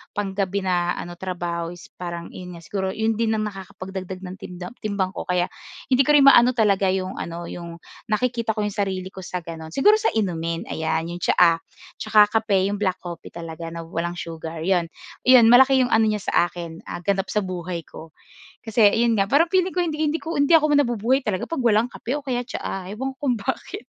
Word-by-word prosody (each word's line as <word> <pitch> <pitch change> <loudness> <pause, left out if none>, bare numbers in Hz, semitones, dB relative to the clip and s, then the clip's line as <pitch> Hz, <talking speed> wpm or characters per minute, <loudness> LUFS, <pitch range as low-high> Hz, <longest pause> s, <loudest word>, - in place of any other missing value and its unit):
pang 205 -1 -2
gabi 195 0 -1
na 175 -2 0
ano, 175 0 -7
trabaho 175 -2 -3
is 175 - -15
parang 170 -1 -6
'yon 180 -1 -9
nga 170 - -11
siguro 190 +1 -2
'yon 220 0 0
din 225 -1 +2
ang 215 - -1
nakakapagdagdag 190 -2 -7
ng 185 0 -7
timdam 180 0 -8
timbang 200 -3 -1
ko. - - -6
Kaya 180 0 +1 0.4
hindi 260 +1 +5
ko - - +5
rin 285 - +7
maano 250 -2 +7
talaga 200 -4 +3
'yong 190 0 -3
ano, 170 0 -5
'yong 170 -1 -7 0.4
nakikita 230 0 0
ko 215 - -1
'yong 210 - -1
sarili 190 -2 -2
ko 190 - -10
sa 180 0 -4
gano'n. 160 -1 -8
Siguro, 415 - +5
sa 440 - +1
inumin 170 -6 -1
ayan 160 +1 -1
'yong 175 0 -6
tsaa, 170 -2 +5 0.4
tsaka 215 -1 +5
kape, 200 -3 +1
'yong 205 - -2
black 185 -3 -1
coffee 175 -2 -8
talaga 165 0 -7
na 170 - -5
walang 170 +1 -4
sugar 165 -1 -6
'yon, 175 -1 +1 0.4
'yon 255 -2 +8
malaki 265 +2 +7
'yong 250 - 0
ano 220 0 +4
niya 210 -1 0
sa 175 - +2
akin, 170 -1 -8
ah, 175 - -6
ganap 195 +1 0
sa 210 - +2
buhay 180 -2 -4
ko, 160 -1 -12 0.5
kasi 225 0 +2 0.2
'yon 235 -1 +3
nga 195 0 +2
parang 310 +7 +4
feeling 375 -1 +2
ko 360 - -1
hindi 310 -2 -3
hindi 320 +2 -1
ko 330 +1 -4
hindi 285 +3 +2
ako 305 -1 +2
nabubuhay 245 -1 +2
talaga 190 -5 -2
'pag 330 -5 -3
walang 225 0 +3
kape 260 +5 -3
o 290 - -17
kaya 245 -2 -1
tsaa. 195 -6 -5
Ewan 265 +6 -4
ko 285 - -2
kung 245 - +2
bakit, 400 - -4
195 Hz, 215 wpm, -23 LUFS, 175-235 Hz, 0.5 s, yon